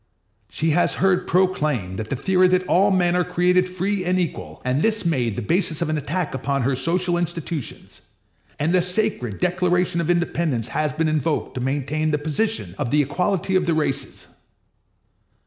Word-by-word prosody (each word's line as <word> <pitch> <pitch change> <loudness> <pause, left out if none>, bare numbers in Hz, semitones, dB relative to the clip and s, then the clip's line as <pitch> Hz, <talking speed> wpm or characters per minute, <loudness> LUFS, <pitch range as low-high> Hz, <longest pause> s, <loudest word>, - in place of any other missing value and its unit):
She 160 +1 0
has 175 +3 +2
heard 190 -1 +1
proclaimed 150 - 0
the 110 +5 -3
theory 185 +7 +3
that 185 0 +2
all 190 +3 +3
men 180 -2 +2
are 180 - +2
created 180 +1 +2
free 185 +2 -1
and 180 +1 +1
equal, 90 - -4
and 130 +3 +1
this 220 -1 +1
made 125 -10 0
the 120 - -4
basis 165 - 0
of 170 -2 -1
an 155 - 0
attack 155 +3 -3
upon 135 +1 -1
her 135 +2 +1
social 175 +6 0
institutions; 165 -5 -5 0.6
and 160 +4 0
the 185 - +4
sacred 180 - 0
Declaration 180 -1 +1
of 170 - -3
Independence 170 -9 0
has 150 +4 -1
been 160 +3 -1
invoked 155 0 -1
to 125 - -4
maintain 145 +4 -1
the 150 - +1
position 205 +10 -1
of 140 -5 -1
the 150 +2 +3
equality 180 +6 -1
of 180 -2 +2
the 165 - +2
races. 150 -3 -3
170 Hz, 175 wpm, -22 LUFS, 145-180 Hz, 0.6 s, the